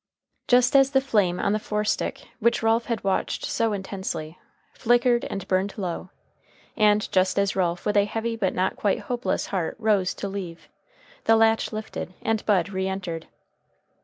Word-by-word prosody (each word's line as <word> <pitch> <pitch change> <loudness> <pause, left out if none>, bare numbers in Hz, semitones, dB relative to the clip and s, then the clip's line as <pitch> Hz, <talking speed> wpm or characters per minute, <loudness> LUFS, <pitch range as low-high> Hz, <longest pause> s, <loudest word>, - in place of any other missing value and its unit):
Just 245 +2 +4
as 270 -1 +6
the 265 - +6
flame 205 -9 +1
on 200 - +1
the 215 - 0
forestick, 210 0 -2
which 235 0 +2
Ralph 225 +1 +2
had 230 -3 -3
watched 195 -1 -1
so 225 -1 0
intensely, 190 -5 -4 0.4
flickered 240 +1 +2
and 195 -1 -5
burned 190 +2 0
low, 185 -2 -4 0.7
and 210 0 +3
just 185 0 +2
as 200 -1 +1
Ralph 175 -2 -1
with 210 - 0
a 200 -1 +5
heavy 225 +2 -3
but 195 -5 -1
not 185 +1 0
quite 205 - 0
hopeless 245 0 -2
heart 180 -4 -1
rose 210 -4 +1
to 200 - -4
leave, 190 -4 -7 0.6
the 225 - +5
latch 225 0 +3
lifted 215 -4 -6
and 225 -1 0
Bud 195 -4 +3
re 190 -1 -2
entered. 180 -4 -4
205 Hz, 165 wpm, -25 LUFS, 190-225 Hz, 0.7 s, as